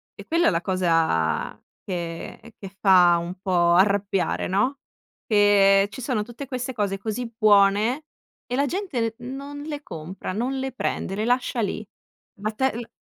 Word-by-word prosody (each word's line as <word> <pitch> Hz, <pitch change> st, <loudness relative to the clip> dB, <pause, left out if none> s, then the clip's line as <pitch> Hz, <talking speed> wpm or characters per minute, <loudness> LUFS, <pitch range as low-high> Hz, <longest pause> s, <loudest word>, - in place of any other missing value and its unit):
è -, -, -11 dB
quella 335 Hz, +1 st, +3 dB
la 165 Hz, -, +1 dB
cosa 165 Hz, -, +1 dB, 0.3 s
che 175 Hz, +5 st, -6 dB
che 195 Hz, -1 st, -10 dB
fa 180 Hz, -3 st, +6 dB
un 170 Hz, +2 st, -5 dB
po' 175 Hz, -3 st, +2 dB
arrabbiare, 195 Hz, 0 st, +1 dB
no? 250 Hz, +9 st, 0 dB, 0.5 s
Che 200 Hz, -2 st, +5 dB
ci 260 Hz, -, -8 dB
sono 240 Hz, -4 st, -1 dB
tutte 240 Hz, +5 st, -9 dB
queste 255 Hz, 0 st, -4 dB
cose 205 Hz, -4 st, -1 dB
così 225 Hz, +4 st, -4 dB
buone 215 Hz, +6 st, +4 dB, 0.4 s
e 250 Hz, -, -2 dB
la 280 Hz, +2 st, +2 dB
gente 280 Hz, -, -2 dB
non 275 Hz, +3 st, -7 dB
le 295 Hz, -1 st, -6 dB
compra, 175 Hz, -, -7 dB
non 250 Hz, +6 st, -2 dB
le 265 Hz, 0 st, -3 dB
prende, 220 Hz, -6 st, -3 dB
le 210 Hz, -, -2 dB
lascia 245 Hz, 0 st, 0 dB
lì. 210 Hz, 0 st, -3 dB, 0.5 s
Ma 215 Hz, +2 st, -2 dB
te 265 Hz, +4 st, 0 dB
l 235 Hz, -1 st, -6 dB
210 Hz, 155 wpm, -24 LUFS, 190-255 Hz, 0.5 s, fa